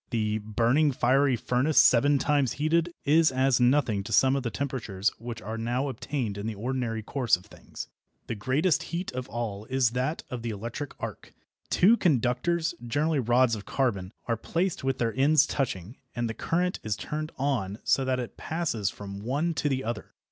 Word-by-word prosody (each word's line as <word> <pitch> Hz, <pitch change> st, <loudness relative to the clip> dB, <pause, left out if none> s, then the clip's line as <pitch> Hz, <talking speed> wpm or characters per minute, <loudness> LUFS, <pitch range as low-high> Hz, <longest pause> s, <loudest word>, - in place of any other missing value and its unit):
The 110 Hz, -2 st, 0 dB
"burning 120 Hz, +8 st, +2 dB
fiery 130 Hz, +2 st, +3 dB
furnace" 125 Hz, +6 st, 0 dB
"seven 140 Hz, +4 st, +6 dB
times 140 Hz, -3 st, +1 dB
heated" 165 Hz, +3 st, +1 dB
is 155 Hz, +1 st, +5 dB
as 130 Hz, -1 st, +2 dB
nothing 125 Hz, -5 st, +3 dB
to -, -, -7 dB
some 130 Hz, 0 st, +4 dB
of 140 Hz, -, 0 dB
the 120 Hz, -, -2 dB
temperatures 110 Hz, -5 st, -2 dB
which 115 Hz, -1 st, -7 dB
are 110 Hz, +1 st, -4 dB
now 125 Hz, +5 st, -1 dB
obtained 125 Hz, -6 st, -3 dB
in 105 Hz, -, -4 dB
the 110 Hz, -, -3 dB
ordinary 115 Hz, 0 st, -2 dB
course 125 Hz, +1 st, +2 dB
of 90 Hz, -, -13 dB
things. -, -, -9 dB, 0.4 s
The -, -, -3 dB
greatest 135 Hz, -, +1 dB
heat 175 Hz, +2 st, -4 dB
of 130 Hz, +1 st, -5 dB
all 110 Hz, -3 st, -4 dB
is 130 Hz, -2 st, +2 dB
that 130 Hz, +6 st, -2 dB
of 125 Hz, -2 st, -4 dB
the 115 Hz, -, -3 dB
electric 115 Hz, +7 st, -5 dB
arc. -, -, -7 dB, 0.3 s
Two 220 Hz, +6 st, +5 dB
conductors, 160 Hz, -, +1 dB
generally 145 Hz, +5 st, 0 dB
rods 120 Hz, 0 st, +3 dB
of 105 Hz, -2 st, -4 dB
carbon, 100 Hz, -9 st, -1 dB
are 115 Hz, -, 0 dB
placed 170 Hz, -, -2 dB
with 135 Hz, -1 st, 0 dB
their 115 Hz, -2 st, 0 dB
ends 140 Hz, +2 st, +5 dB
touching, 115 Hz, -, -3 dB, 0.2 s
and 120 Hz, -1 st, -1 dB
the 110 Hz, -, -3 dB
current 180 Hz, +8 st, -1 dB
is 110 Hz, -1 st, -2 dB
turned 155 Hz, +5 st, -4 dB
on 125 Hz, -8 st, -1 dB
so 135 Hz, -, +2 dB
that 130 Hz, -1 st, 0 dB
it 120 Hz, -, -6 dB
passes 150 Hz, -, -1 dB
from 100 Hz, -1 st, -8 dB
one 145 Hz, +9 st, 0 dB
to 150 Hz, -, 0 dB
the 135 Hz, -1 st, -1 dB
other. 115 Hz, -2 st, -5 dB
125 Hz, 185 wpm, -27 LUFS, 115-145 Hz, 0.4 s, seven